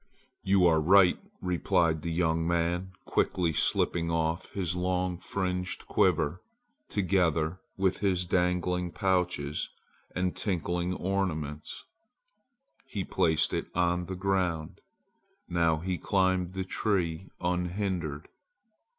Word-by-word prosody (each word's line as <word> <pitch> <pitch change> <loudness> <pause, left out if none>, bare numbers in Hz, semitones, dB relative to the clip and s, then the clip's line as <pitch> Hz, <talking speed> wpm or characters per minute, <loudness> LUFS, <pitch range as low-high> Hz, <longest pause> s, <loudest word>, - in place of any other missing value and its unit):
"You 95 -1 +4
are 80 -2 +4
right," 90 +2 +6 0.2
replied 85 -3 +1
the 85 - -3
young 80 -1 +1
man, 85 +2 0
quickly 85 -3 +1
slipping 85 +3 +1
off 80 0 -1
his 90 -3 -2
long 90 0 -1
fringed 90 -1 -3
quiver. 75 +5 +2 0.5
Together 90 -3 +1 0.2
with 95 -1 +1
his 90 -3 +1
dangling 90 0 0
pouches 90 -7 0 0.5
and 90 0 0
tinkling 90 -1 -1
ornaments, 80 -7 -3 1.0
he 100 -5 -3
placed 80 -3 +2
it - - -1
on 90 0 +1
the 95 - -4
ground. 90 -4 -1 0.7
Now 85 -2 +2
he 90 +2 -3
climbed 95 -2 +1
the 95 0 -2
tree 95 -4 -1
unhindered. 90 -3 -2
90 Hz, 105 wpm, -29 LUFS, 85-95 Hz, 1.0 s, right